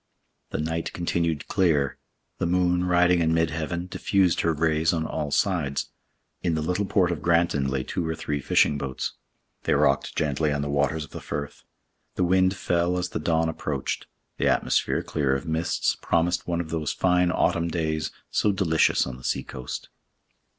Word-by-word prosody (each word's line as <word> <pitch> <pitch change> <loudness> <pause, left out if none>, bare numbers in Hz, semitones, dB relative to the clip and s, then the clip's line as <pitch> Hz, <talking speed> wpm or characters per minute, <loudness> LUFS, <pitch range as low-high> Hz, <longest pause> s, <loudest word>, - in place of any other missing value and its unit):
The - - -3
night 80 +2 -2
continued 85 -3 -1
clear. 75 -8 +1 0.4
The - - 0
moon, 90 0 +2
riding 90 0 +4
in 80 0 +2
mid 80 -1 +2
heaven, 85 +2 -3
diffused 95 -1 +1
her 85 - +2
rays 80 +1 +2
on 80 -2 -1
all 75 -2 -3
sides. 75 -4 0 0.5
In 85 -3 0
the 80 - -1
little 90 +5 0
port 95 -3 +2
of 85 - -3
Granton 85 -5 +2
lay 65 -1 -1
two 85 +4 -3
or 80 - -1
three 75 -2 -3
fishing 70 +1 +3
boats; 70 -2 -3 0.5
they - - +1
rocked 70 0 +2
gently 75 0 0
on 70 0 -1
the 70 - -3
waters 70 +2 0
of - - -21
the - - -7
Firth. 70 0 -5 0.5
The - - +1
wind 95 +1 +3
fell 90 0 0
as 90 - -2
the - - -3
dawn 80 -1 +1
approached. 75 -4 -3 0.3
The - - +1
atmosphere, - - +1
clear 70 -3 0
of 70 - -4
mists, 80 +1 0
promised 85 +1 +1
one 85 -1 0
of 80 -2 -8
those 80 -3 -1
fine 90 -1 +2
autumn 85 -1 +1
days 80 -2 -1 0.2
so 105 - +2
delicious 90 -5 +2
on 65 -1 -6
the 65 - -15
sea - - -1
coast. 65 0 -7
80 Hz, 180 wpm, -25 LUFS, 75-90 Hz, 0.5 s, riding